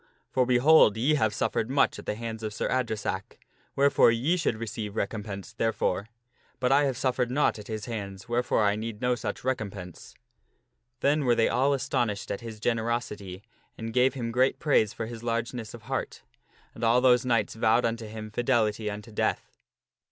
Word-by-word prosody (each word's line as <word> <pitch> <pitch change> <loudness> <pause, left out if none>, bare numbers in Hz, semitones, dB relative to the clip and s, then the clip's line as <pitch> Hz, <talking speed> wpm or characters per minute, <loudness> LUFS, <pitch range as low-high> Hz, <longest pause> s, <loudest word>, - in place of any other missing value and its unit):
For, 130 -2 +2
behold! 125 -3 +6
ye 130 +7 +2
have 110 -8 +2
suffered 110 +1 -1
much 140 +1 +2
at - - -11
the - - -1
hands 115 0 -6
of 105 -1 -4
Sir - - -1
Adresack, 110 -6 -2 0.4
wherefore 140 -2 +5
ye 125 +10 +2
should 170 -10 0
receive 110 -2 -5
recompense 100 -1 -4
therefore, 110 -4 -1 0.5
but 125 +1 +1
I 145 +1 +5
have 135 -3 -1
suffered 130 -2 0
naught 130 -3 +1
at 105 - -10
his 110 -1 -4
hands, 100 -5 -6
wherefore 120 -2 +1
I 100 0 +3
need 110 0 -5
no 125 +1 +1
such 120 - -4
recompense." 100 -8 -5 0.9
Then 145 +1 +2
were 120 -2 +3
they 115 - +3
all 130 +4 +2
astonished 120 -6 -1
at 100 - -4
his 115 -2 -8
generosity 110 -5 -2 0.3
and 115 0 -5
gave 130 +2 +3
him 115 -3 -3
great 130 +3 +2
praise 125 -9 +2
for 115 - -5
his 115 0 -8
largeness 115 -1 -3
of - - -13
heart. - - -4 0.5
And - - -9
all 115 +2 +4
those 125 -1 +4
knights 115 -4 +1
vowed 115 +1 +2
unto 115 -1 -2
him 110 0 -8
fidelity 110 -3 +1
unto 105 +2 -7
death. 105 - -2
115 Hz, 180 wpm, -27 LUFS, 110-125 Hz, 0.9 s, behold